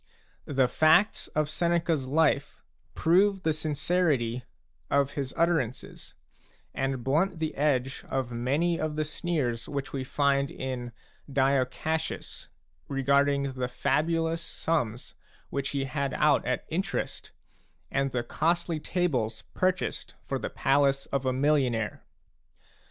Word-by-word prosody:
The 135 Hz, -3 st, +3 dB
facts 160 Hz, -, +4 dB
of 155 Hz, -1 st, +2 dB
Seneca's 170 Hz, -3 st, 0 dB
life 145 Hz, 0 st, +1 dB, 0.3 s
prove 190 Hz, +3 st, +3 dB
the 160 Hz, -, +2 dB
sincerity 150 Hz, -5 st, 0 dB, 0.5 s
of 140 Hz, -1 st, +2 dB
his 135 Hz, -2 st, -3 dB
utter 170 Hz, 0 st, +4 dB
ances, 125 Hz, -3 st, -6 dB, 0.6 s
and 135 Hz, -2 st, -2 dB
blunt 165 Hz, +8 st, +1 dB
the 160 Hz, -1 st, -2 dB
edge 135 Hz, -2 st, 0 dB
of 130 Hz, -2 st, -1 dB
many 145 Hz, +9 st, 0 dB
of 155 Hz, -1 st, -2 dB
the 155 Hz, 0 st, 0 dB
sneers 145 Hz, -8 st, -2 dB
which 140 Hz, -1 st, -4 dB
we 135 Hz, -1 st, -2 dB
find 140 Hz, +1 st, +1 dB
in 125 Hz, -2 st, -5 dB, 0.4 s
Dio 135 Hz, -1 st, +3 dB
Cassius, 160 Hz, +5 st, -4 dB, 0.4 s
regarding 140 Hz, 0 st, +2 dB
the 130 Hz, -1 st, -2 dB
fabulous 165 Hz, +5 st, 0 dB
sums 125 Hz, -10 st, -2 dB, 0.4 s
which 140 Hz, 0 st, -1 dB
he 140 Hz, -1 st, -1 dB
had 140 Hz, 0 st, -2 dB
out -, -, +3 dB
at -, -, -1 dB
interest -, -, -3 dB, 0.6 s
and 135 Hz, 0 st, 0 dB
the 120 Hz, -1 st, -1 dB
costly 165 Hz, +4 st, 0 dB
tables 125 Hz, -11 st, -1 dB
purchased 185 Hz, 0 st, -1 dB
for -, -, -3 dB
the -, -, -3 dB
palace 135 Hz, 0 st, +2 dB
of 135 Hz, -1 st, 0 dB
a -, -, +3 dB
millionaire. 130 Hz, -5 st, +1 dB
140 Hz, 125 wpm, -28 LUFS, 130-160 Hz, 0.6 s, facts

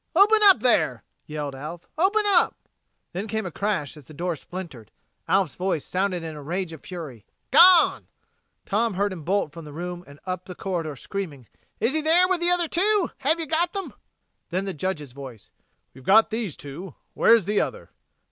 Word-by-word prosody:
"Open 420 Hz, +4 st, +6 dB
up 385 Hz, -, +7 dB
there!" 155 Hz, -, +2 dB, 0.2 s
yelled 150 Hz, -2 st, -4 dB
Alf. 155 Hz, +6 st, -8 dB
"Open 400 Hz, +6 st, +2 dB
up!" 375 Hz, -3 st, +3 dB, 0.6 s
Then 195 Hz, +5 st, -4 dB
came 220 Hz, -1 st, -2 dB
a 175 Hz, -, -4 dB
crash 190 Hz, -7 st, -2 dB
as 150 Hz, -3 st, -14 dB
the 155 Hz, -, -14 dB
door 175 Hz, +2 st, -2 dB
splintered. 155 Hz, -, -9 dB, 0.4 s
Alf's 190 Hz, -8 st, +2 dB
voice 180 Hz, -3 st, -2 dB
sounded 185 Hz, -2 st, -1 dB
in 160 Hz, -1 st, -6 dB
rage 175 Hz, +2 st, -3 dB
of 160 Hz, -, -11 dB
fury: 155 Hz, -, -8 dB, 0.3 s
"Gone!" 350 Hz, +5 st, +7 dB, 0.6 s
Tom 220 Hz, 0 st, 0 dB
heard 200 Hz, +1 st, 0 dB
him 175 Hz, -, -8 dB
bolt 190 Hz, -2 st, 0 dB
from 165 Hz, +1 st, -10 dB
the 150 Hz, -, -10 dB
room 175 Hz, +3 st, -6 dB
and 140 Hz, 0 st, -14 dB
up 185 Hz, -1 st, -4 dB
the 180 Hz, -, -9 dB
corridor, 170 Hz, -7 st, -3 dB
screaming: 150 Hz, -4 st, -6 dB, 0.3 s
"Is 235 Hz, +4 st, +1 dB
he 315 Hz, -, +1 dB
in 310 Hz, -, -6 dB
there 345 Hz, +3 st, +5 dB
with 370 Hz, -1 st, +1 dB
the 345 Hz, 0 st, +1 dB
other 355 Hz, -1 st, +2 dB
two? 395 Hz, +3 st, +2 dB
Have 310 Hz, +5 st, +2 dB
you 325 Hz, -, -2 dB
got 335 Hz, +4 st, 0 dB
them?" 395 Hz, -1 st, -5 dB, 0.6 s
Then 185 Hz, +2 st, -2 dB
the 195 Hz, -, -3 dB
Judge's 150 Hz, -4 st, -4 dB
voice: 130 Hz, -5 st, -11 dB, 0.4 s
"We've 130 Hz, -, -15 dB
got 215 Hz, +9 st, +5 dB
these 220 Hz, -, -3 dB
two. 145 Hz, +5 st, -9 dB, 0.2 s
Where's 230 Hz, -5 st, +5 dB
the 205 Hz, +1 st, +1 dB
other?" -, -, -5 dB
185 Hz, 190 wpm, -24 LUFS, 155-250 Hz, 0.6 s, up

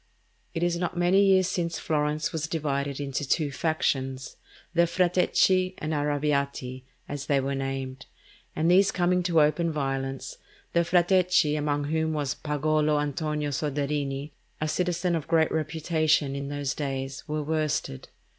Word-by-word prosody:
It 165 Hz, -, -1 dB
is 175 Hz, -1 st, +1 dB
not 175 Hz, 0 st, -3 dB
many 180 Hz, +3 st, +4 dB
years 190 Hz, -2 st, +4 dB
since 170 Hz, -2 st, -2 dB
Florence 150 Hz, 0 st, -1 dB
was 160 Hz, -1 st, -2 dB
divided 140 Hz, -3 st, -2 dB
into 140 Hz, 0 st, -3 dB
two 145 Hz, +1 st, 0 dB
factions, 135 Hz, -4 st, -1 dB, 0.4 s
the 170 Hz, 0 st, +4 dB
Frateschi 185 Hz, +1 st, +2 dB
and 155 Hz, +1 st, -3 dB
Arrabbiati, 140 Hz, -3 st, -1 dB, 0.3 s
as 145 Hz, -1 st, -5 dB
they 140 Hz, -1 st, +3 dB
were 135 Hz, +1 st, -2 dB
named, 135 Hz, -1 st, -4 dB, 0.5 s
and 160 Hz, +3 st, +2 dB
these 195 Hz, +2 st, +5 dB
coming 180 Hz, 0 st, +2 dB
to 170 Hz, -3 st, +3 dB
open 165 Hz, +3 st, +1 dB
violence, 135 Hz, -2 st, -3 dB, 0.3 s
the 170 Hz, -, +4 dB
Frateschi, 180 Hz, -2 st, +3 dB
among 145 Hz, -1 st, 0 dB
whom 160 Hz, +2 st, 0 dB
was 145 Hz, -3 st, -1 dB
Pagolo 150 Hz, 0 st, +1 dB
Antonio 150 Hz, 0 st, -2 dB
Soderini, 145 Hz, 0 st, -2 dB, 0.3 s
a 155 Hz, -, -1 dB
citizen 180 Hz, +2 st, 0 dB
of 155 Hz, -3 st, -3 dB
great 160 Hz, -1 st, +3 dB
reputation 155 Hz, -2 st, +1 dB
in 140 Hz, 0 st, -4 dB
these 145 Hz, -2 st, -2 dB
days, 135 Hz, -2 st, -4 dB
were 150 Hz, 0 st, -2 dB
worsted. 155 Hz, -, -2 dB
150 Hz, 145 wpm, -27 LUFS, 140-170 Hz, 0.5 s, these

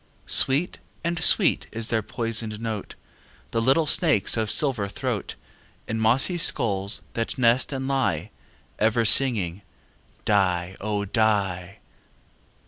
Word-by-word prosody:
Sweet 145 Hz, +7 st, +1 dB, 0.2 s
and 170 Hz, 0 st, -2 dB
sweet -, -, +4 dB
is 115 Hz, 0 st, -3 dB
their 110 Hz, -1 st, 0 dB
poisoned 115 Hz, -1 st, -3 dB
note, 110 Hz, -3 st, -6 dB, 0.6 s
The 115 Hz, -, -1 dB
little 135 Hz, +7 st, +2 dB
snakes' 150 Hz, -, +2 dB
of 110 Hz, -2 st, -2 dB
silver 125 Hz, -8 st, +1 dB
throat, 100 Hz, -, -4 dB, 0.5 s
In 110 Hz, -, -3 dB
mossy 130 Hz, +11 st, +2 dB
skulls 100 Hz, -10 st, +1 dB
that 115 Hz, -1 st, -3 dB
nest 120 Hz, +2 st, +2 dB
and 135 Hz, -1 st, -4 dB
lie, 135 Hz, -2 st, -1 dB, 0.5 s
Ever 115 Hz, +1 st, +1 dB
singing 105 Hz, -7 st, +3 dB, 0.6 s
"die, 95 Hz, -3 st, 0 dB
oh! 105 Hz, 0 st, -2 dB
die." 100 Hz, -4 st, -1 dB
110 Hz, 120 wpm, -24 LUFS, 100-130 Hz, 0.6 s, sweet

